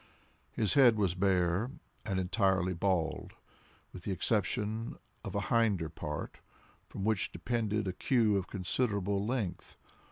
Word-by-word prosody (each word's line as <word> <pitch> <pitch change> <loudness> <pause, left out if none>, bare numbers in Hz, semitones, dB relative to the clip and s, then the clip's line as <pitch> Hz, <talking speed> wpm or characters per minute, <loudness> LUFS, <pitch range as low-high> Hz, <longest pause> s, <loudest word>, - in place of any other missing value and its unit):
His 110 -3 +1
head 130 -5 +7
was 100 -5 +2
bare, 95 +3 +1 0.4
and 95 -3 -1
entirely 95 -1 +2
bald, 85 -2 -1 0.6
with 90 - -8
the 100 - -4
exception 110 +3 -1 0.3
of - - -6
a - - +1
hinder 105 -9 +2
part, 75 -2 -5 0.5
from 95 - -6
which 110 -2 +1
depended 110 +2 -1
a 95 - -1
queue 110 0 +2
of 95 -1 -1
considerable 100 0 -1
length. 110 -5 -3
100 Hz, 130 wpm, -32 LUFS, 90-110 Hz, 0.6 s, head